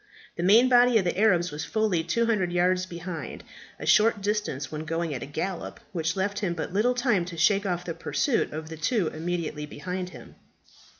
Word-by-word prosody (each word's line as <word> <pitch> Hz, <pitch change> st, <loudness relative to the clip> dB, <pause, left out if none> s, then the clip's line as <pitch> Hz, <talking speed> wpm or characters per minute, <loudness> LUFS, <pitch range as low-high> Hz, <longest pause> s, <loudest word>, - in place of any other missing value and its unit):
The -, -, -4 dB
main 215 Hz, +8 st, +6 dB
body 245 Hz, -1 st, +5 dB
of 205 Hz, -, +2 dB
the 175 Hz, -, 0 dB
Arabs 180 Hz, -4 st, +3 dB
was 150 Hz, +1 st, -5 dB
fully 210 Hz, -6 st, 0 dB
200 210 Hz, 0 st, +1 dB
yards 180 Hz, +1 st, +2 dB
behind 170 Hz, -1 st, -6 dB, 0.4 s
a -, -, -6 dB
short 215 Hz, 0 st, +4 dB
distance 200 Hz, -9 st, -2 dB
when 155 Hz, 0 st, -4 dB
going 165 Hz, 0 st, -2 dB
at 125 Hz, -, -5 dB
a -, -, -6 dB
gallop 175 Hz, +5 st, -4 dB
which 165 Hz, -1 st, -1 dB
left 200 Hz, +1 st, -1 dB
him 180 Hz, -5 st, -1 dB
but 165 Hz, -, -4 dB
little 235 Hz, +5 st, +2 dB
time 240 Hz, -7 st, +2 dB
to 170 Hz, -1 st, -8 dB
shake 200 Hz, +4 st, +3 dB
off 180 Hz, -1 st, -2 dB
the 170 Hz, -, -3 dB
pursuit 260 Hz, -, 0 dB
of 155 Hz, +1 st, -6 dB
the 160 Hz, -, -7 dB
two 175 Hz, +3 st, +1 dB
immediately 160 Hz, -2 st, -4 dB
behind 180 Hz, +5 st, -5 dB
him. -, -, -12 dB
180 Hz, 195 wpm, -26 LUFS, 165-210 Hz, 0.4 s, main